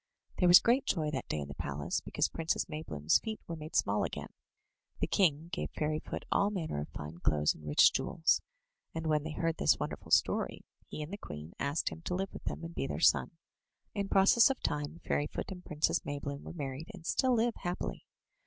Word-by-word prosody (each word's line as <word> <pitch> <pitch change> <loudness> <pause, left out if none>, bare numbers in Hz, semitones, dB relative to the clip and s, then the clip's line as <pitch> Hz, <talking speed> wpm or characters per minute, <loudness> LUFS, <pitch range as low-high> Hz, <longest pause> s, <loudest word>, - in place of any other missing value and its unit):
There 180 - +5
was 175 0 +11
great 245 +7 +3
joy 155 -4 0
that 130 -4 -3
day - - -2
in 70 -1 -4
the 70 - -7
palace 70 +1 -3
because - - 0
Princess 165 -1 -1
Maybloom's 80 - +1
feet 220 -1 -5
were 170 - -5
made 155 +1 -8
small - - +2
again. - - -5 0.7
The - - +2
king 165 -4 +2
gave - - -2
Fairy 155 0 0
foot - - -6
all 200 - +3
manner 165 - -3
of 75 - -6
fine 75 +3 -8
clothes 75 -3 +2
alnd 75 - -12
rich 75 - +6
jewels; 165 -1 +2 0.5
and 160 - -3
when 155 -1 +2
they 155 +1 -5
heard 165 +1 -1
this - - +4
wonderful - - -5
story, - - +2 0.2
he 155 - -5
and 155 +6 -8
the - - -3
queen 75 - -8
asked 140 +3 0
him - - -9
to 180 - -1
live 195 +1 -3
with - - -9
them - - -3
and 165 +1 -6
be 135 - -2
their - - -3
son. 165 - +3 0.6
In 200 -2 -2
process 200 +5 +6
of 270 - -1
time 150 +2 -2
Fairyfoot 145 +6 -2
and 180 -1 -7
Princess 150 0 +1
Maybloom 140 0 -4
were - - -8
married, 145 +1 -5
and 170 -3 -13
still 255 +6 +2
live 230 +1 +2
happily. 175 -1 -4
160 Hz, 210 wpm, -32 LUFS, 140-180 Hz, 0.7 s, was